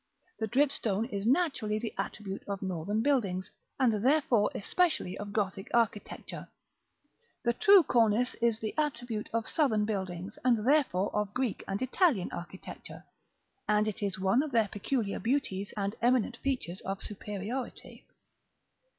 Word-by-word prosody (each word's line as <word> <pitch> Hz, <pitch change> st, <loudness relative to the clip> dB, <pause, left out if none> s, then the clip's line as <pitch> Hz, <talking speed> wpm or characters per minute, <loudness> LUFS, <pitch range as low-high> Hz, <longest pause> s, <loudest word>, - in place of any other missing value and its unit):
The 220 Hz, -, -1 dB
dripstone 235 Hz, -5 st, +1 dB
is 200 Hz, -1 st, -3 dB
naturally 260 Hz, -7 st, +2 dB
the 225 Hz, 0 st, -4 dB
attribute 200 Hz, -2 st, -4 dB
of 200 Hz, -1 st, -4 dB
Northern 190 Hz, +4 st, -1 dB
buildings, 200 Hz, -10 st, 0 dB, 0.3 s
and 225 Hz, -5 st, +2 dB
therefore 260 Hz, -6 st, +3 dB
especially 310 Hz, -, +1 dB
of 205 Hz, 0 st, -6 dB
Gothic 195 Hz, -2 st, -2 dB
architecture; 225 Hz, -3 st, -1 dB, 1.0 s
the 235 Hz, -1 st, +2 dB
true 395 Hz, -, +7 dB
cornice 235 Hz, -1 st, +3 dB
is 230 Hz, -2 st, +2 dB
the 220 Hz, -1 st, -3 dB
attribute 245 Hz, -7 st, -2 dB
of 230 Hz, -1 st, -1 dB
Southern 225 Hz, -9 st, +2 dB
buildings, 190 Hz, -1 st, -4 dB
and 235 Hz, -3 st, +2 dB
therefore 260 Hz, -10 st, +2 dB
of 210 Hz, -1 st, -1 dB
Greek 255 Hz, -4 st, -1 dB
and 195 Hz, +1 st, -2 dB
Italian 260 Hz, -, +2 dB
architecture; 175 Hz, +2 st, -8 dB, 0.7 s
and 210 Hz, 0 st, +3 dB
it 215 Hz, -, -4 dB
is 195 Hz, -2 st, -1 dB
one 195 Hz, +7 st, +3 dB
of 305 Hz, -, -3 dB
their 225 Hz, -5 st, +2 dB
peculiar 210 Hz, 0 st, -2 dB
beauties, 230 Hz, -6 st, -1 dB
and 200 Hz, 0 st, -1 dB
eminent 240 Hz, 0 st, +2 dB
features 250 Hz, -11 st, -3 dB
of 195 Hz, 0 st, -4 dB
superiority. 210 Hz, +5 st, -6 dB
215 Hz, 140 wpm, -30 LUFS, 200-255 Hz, 1.0 s, true